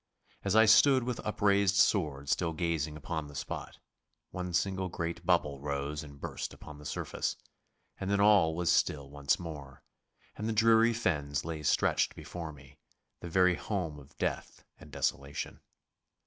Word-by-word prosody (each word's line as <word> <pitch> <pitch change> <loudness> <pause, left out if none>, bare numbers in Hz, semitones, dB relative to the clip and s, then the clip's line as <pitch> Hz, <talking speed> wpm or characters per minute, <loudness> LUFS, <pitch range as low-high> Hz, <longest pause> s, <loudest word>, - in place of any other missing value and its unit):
As 100 +1 0
I 110 0 +7
stood 130 +4 +6
with 125 -1 -3
upraised 100 -2 +2
sword 80 -7 +2
still 80 +3 0
gazing 80 -2 -1
upon 80 0 -4
the 75 - -12
spot, - - -6 0.5
one 90 -1 -4
single 95 +1 0
great 85 0 -4
bubble 75 -6 +2
rose 70 +1 -3
and 70 -2 -12
burst - - -5
upon 75 -1 -11
the 75 - -8
surface, - - -3 0.6
and 95 - -3
then 100 0 +2
all 100 -6 +5
was 85 0 +1
still 70 -2 +1
once 70 -1 +1
more, 75 -6 -9 0.5
and 110 +2 -3
the - - 0
dreary 115 +1 +5
fens 75 -10 -1
lay 80 -2 -4
stretched 75 - +2
before 85 -3 -7
me, 70 -1 -16 0.4
the 85 - -7
very 90 +1 +4
home 85 -6 -3
of 70 0 -17
death - - -3 0.2
and - - -13
of - - -17
desolation. 70 +1 -2
85 Hz, 160 wpm, -31 LUFS, 75-100 Hz, 0.6 s, I